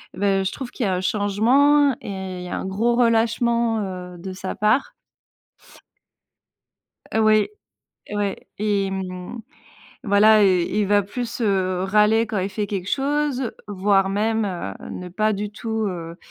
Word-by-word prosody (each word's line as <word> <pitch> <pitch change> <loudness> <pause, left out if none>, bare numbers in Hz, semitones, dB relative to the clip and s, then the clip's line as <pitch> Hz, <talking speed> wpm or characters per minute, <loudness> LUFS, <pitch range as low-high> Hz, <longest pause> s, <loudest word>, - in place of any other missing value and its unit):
ben 195 -1 +1
je 190 - -1
trouve 260 -3 -7
qu'il 255 - -4
y - - +1
a 185 - +1
un 180 - -2
changement 245 +9 +3
et 190 -2 -6
il - - -7
y - - -7
a - - -3
un - - -4
gros 220 +5 +1
relâchement, 235 -1 +2
heu, 180 -2 -6
de 185 +2 -7
sa 190 0 -5
part. 215 +6 +1 2.2
Ouais, 215 -1 +4 0.6
ouais 205 -1 -3
et 200 -2 0
mmh, 185 +3 -5 0.6
voilà, 210 +1 +5
heu, 185 -2 +4
il 205 +4 0
va 205 +1 +3
plus, 235 +4 -5
heu, 190 -4 +1
râler 210 +3 +3
quand 215 -2 -2
il 185 - -1
fait 205 +1 -3
quelque 190 -2 -4
chose, 275 -3 0 0.2
voire 195 -1 +2
même, 215 +2 0
heu, 175 - -4 0.2
ne 180 - -6
pas 215 +4 0
du 205 0 -3
tout, 220 +1 -3
heu, 170 -2 -6
205 Hz, 160 wpm, -22 LUFS, 190-225 Hz, 2.2 s, voilà